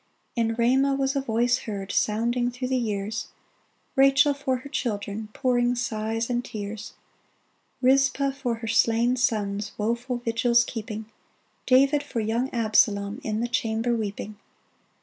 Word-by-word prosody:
In 225 -1 0
Ramah 265 +4 +3
was 270 0 0
a 275 - +1
voice 240 0 +1
heard 200 -2 -4
Sounding 240 +3 +1
through 250 +1 -5
the 260 - +1
years 215 -1 -3 0.3
— - - -42
Rachel 275 +2 +5
for 270 -2 -1
her - - -7
children 215 -5 -3
Pouring 245 -1 +1
sighs 225 -2 -2
and 245 -1 -1
tears 215 0 -6
f - - -35
Rizpah 270 +1 +3
for 265 -4 -2
her 225 0 -7
slain 230 +2 +3
sons 210 -4 -1
Woful 235 +4 -1
vigils 235 0 +2
keeping; 220 -2 -6 0.6
David 275 +3 +5
for 285 -5 -4
young 230 +4 0
Absalom 210 -3 +2
In 215 0 -2
the 240 - 0
chamber 235 -1 0
weeping 210 -1 -4
235 Hz, 145 wpm, -25 LUFS, 220-255 Hz, 0.6 s, Rachel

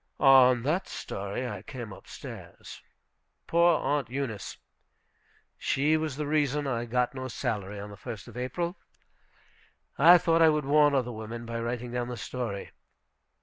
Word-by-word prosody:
On 130 -3 +6
that 160 +8 0
story 100 +6 -5
I 105 -5 -6
came 115 -2 -8
up - - -14
stairs. - - -10 0.6
Poor 170 -1 +4
Aunt 140 -3 -1
Eunice! 125 -7 -4 1.0
She 150 +3 +2
was 155 -3 -2
the 150 +1 -3
reason 145 -1 +1
I 120 -3 -1
got 125 +1 0
no 130 -1 -5
salary 105 -6 -3
on 105 +1 -7
the - - -9
1st 110 +1 -8
of 120 - -12
April. 170 +9 -3 1.2
I 170 +5 +9
thought 165 -1 +2
I 160 - +7
would 150 -2 0
warn 145 0 +4
other 125 -2 0
women 115 +1 -7
by 115 0 -4
writing 120 +1 -3
down 120 0 -2
the 125 -1 -5
story. 105 +1 -5
125 Hz, 155 wpm, -28 LUFS, 115-145 Hz, 1.2 s, I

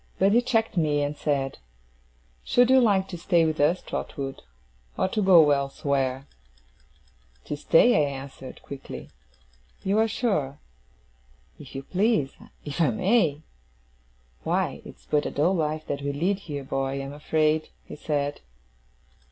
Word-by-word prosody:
But 195 +1 +3
he 235 +3 +5
checked 225 -4 0
me 150 -3 +2
and 145 +1 -2
said: 140 -3 -2 0.8
'Should 245 +1 +3
you 260 0 +7
like 195 -5 +3
to 175 - -6
stay 170 -1 +3
with 155 -1 -1
us, 160 +5 +2
Trotwood, 135 -2 -5 0.6
or - - +2
to 215 - -1
go 170 -6 +6
elsewhere?' 135 -1 -1 1.2
'To - - -3
stay,' 155 +1 +4
I - - -2
answered, 135 -1 -9
quickly. 140 -1 -9 0.7
'You 200 +3 +1
are 225 - +4
sure?' 195 - -1 1.0
'If - - -12
you 135 - -5
please. 185 - +1 0.3
If 145 +3 -3
I 160 - +4
may!' 185 -8 +1 1.0
'Why, - - -1
it's - - -14
but 150 -1 +1
a - - -2
dull 160 +6 +1
life 155 -2 -1
that 140 - -3
we 140 0 -2
lead 180 +8 0
here, 145 -7 -6
boy, 135 0 -2
I - - -3
am 135 0 -5
afraid,' 155 +1 0 0.2
he - - -9
said. 145 -1 -2
155 Hz, 150 wpm, -26 LUFS, 140-190 Hz, 1.2 s, you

